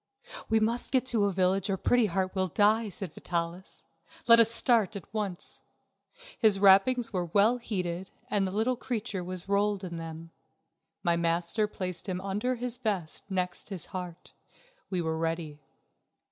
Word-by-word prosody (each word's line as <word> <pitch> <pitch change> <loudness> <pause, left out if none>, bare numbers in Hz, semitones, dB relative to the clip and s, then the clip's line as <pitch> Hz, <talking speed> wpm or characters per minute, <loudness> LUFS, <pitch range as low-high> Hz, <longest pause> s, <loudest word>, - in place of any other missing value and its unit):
"We 225 - +4
must 230 +3 0
get 260 -1 +2
to 225 -5 +2
a 200 - +1
village 190 +1 +1
or 195 - 0
Pretty 240 +3 +3
Heart 185 0 -1
will 190 -1 0
die," 210 +5 +2
said 190 -3 -7
Vitalis. 170 +1 -5 0.4
"Let 230 0 +9
us 230 -1 +7
start 230 -3 +2
at 200 - -6
once." 205 -5 -4 0.8
His 215 -4 +4
wrappings 205 +5 +5
were 180 -2 0
well 205 +8 +3
heated 185 -5 -3 0.2
and 200 -2 +1
the - - -4
little 220 +6 +1
creature 220 -6 -4
was 185 0 -6
rolled 200 0 +1
in 170 -2 -5
them. 165 0 -8 0.7
My 170 -1 +2
master 170 +5 0
placed 185 -1 -5
him 180 -1 -2
under 205 +6 -1
his 245 0 -3
vest, 200 -8 -3
next 180 0 -3
his 185 -4 -2
heart. 180 -2 -7 0.6
We 180 -3 -1
were 160 0 -2
ready. 165 -2 -3
195 Hz, 160 wpm, -29 LUFS, 175-220 Hz, 0.8 s, Let